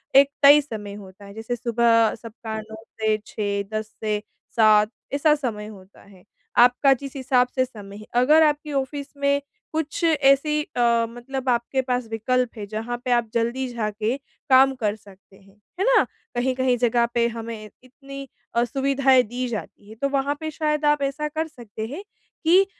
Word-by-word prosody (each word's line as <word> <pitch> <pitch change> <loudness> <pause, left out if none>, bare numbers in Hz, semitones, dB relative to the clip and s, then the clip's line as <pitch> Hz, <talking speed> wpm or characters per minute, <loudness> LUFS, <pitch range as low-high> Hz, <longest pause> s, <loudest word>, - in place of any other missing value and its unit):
एक 275 +1 +7
तय 285 +1 +9
समय 215 -7 -7
होता 200 0 -12
है। 200 - -11
जैसे 225 +3 -4
सुबह 235 -1 +3
सबका 220 -1 -7
9 220 0 -11 0.3
से 215 0 +2
6 200 -1 -2
10 215 - -3 0.2
से 210 -1 0 0.3
7 215 -2 +5 0.2
ऐसा 295 +2 +4
समय 230 -8 -4
होता 195 -2 -14
है। 195 -2 -19 0.3
आपका 250 +3 +6
जिस 275 +1 -7
हिसाब 255 -2 +2
से 255 -1 +2
समय 205 -5 -11
है, 215 - -11
अगर 300 +6 +5
आपके 295 0 0
ऑफिस 280 +1 -2
में 280 0 +1 0.3
कुछ 315 +2 -3
ऐसी 300 -1 +3
अ, 235 -3 +1
मतलब 255 +2 -5
आपके 240 +2 +1
पास 250 -2 -2
विकल्प 245 +2 0
है, 210 - -5
जहाँ 225 +3 -4
पे 250 - 0
आप 240 -2 +2
जल्दी 235 +3 0
जाके 215 +1 -2 0.3
काम 265 +1 +6
कर 215 -4 -1
सकते 195 -2 -19
हैं, 195 0 -22 0.2
है 390 - +1
ना? - - +5 0.3
कहीं-कहीं 255 0 +1
जगह 235 0 +2
पे 235 0 +2
हमें 225 -2 -7
इतनी 275 +2 -10 0.3
अ, 235 - +3
सुविधाएँ 265 +1 +3
दी 245 +3 -4
जाती 210 -2 -7
है, 220 - -11
तो 275 +5 -1
वहाँ 280 +1 0
पे 315 0 -4
शायद 300 -1 -1
आप 295 -1 +3
ऐसा 275 +2 -1
कर 315 +2 -3
सकते 225 -6 -8
हैं, 300 - -7 0.4
कि 365 +4 +6
245 Hz, 175 wpm, -23 LUFS, 220-275 Hz, 0.4 s, तय